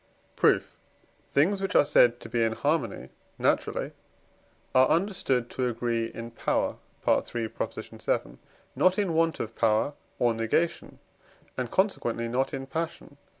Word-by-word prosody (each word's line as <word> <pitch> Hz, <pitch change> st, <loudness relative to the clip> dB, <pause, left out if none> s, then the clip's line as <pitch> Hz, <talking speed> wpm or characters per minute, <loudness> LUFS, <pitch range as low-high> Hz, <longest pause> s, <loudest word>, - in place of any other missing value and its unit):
Proof. -, -, +2 dB, 0.6 s
Things, 190 Hz, +8 st, +3 dB
which 195 Hz, -, -2 dB
are -, -, +6 dB
said 120 Hz, -3 st, +4 dB
to -, -, -8 dB
be 120 Hz, -1 st, 0 dB
in 110 Hz, 0 st, +1 dB
harmony 140 Hz, -, -1 dB, 0.3 s
naturally, -, -, 0 dB, 0.8 s
are 130 Hz, 0 st, +6 dB
understood 165 Hz, -, +1 dB
to 130 Hz, -1 st, -1 dB
agree 115 Hz, -1 st, -1 dB
in 115 Hz, +1 st, -8 dB
power -, -, -1 dB, 0.3 s
(III. 120 Hz, -1 st, +1 dB
vii.), 110 Hz, -, -3 dB, 0.4 s
not 185 Hz, 0 st, +3 dB
in 200 Hz, -5 st, +1 dB
want 165 Hz, 0 st, +2 dB
of 115 Hz, +1 st, -4 dB
power 110 Hz, +5 st, +2 dB, 0.2 s
or 120 Hz, -1 st, +2 dB
negation, 115 Hz, +9 st, -1 dB, 0.6 s
and 125 Hz, -2 st, -3 dB
consequently 120 Hz, -, 0 dB
not 125 Hz, +3 st, 0 dB
in 135 Hz, -, -4 dB
passion 160 Hz, +5 st, -4 dB
(III. -, -, -36 dB
130 Hz, 140 wpm, -27 LUFS, 115-165 Hz, 0.8 s, are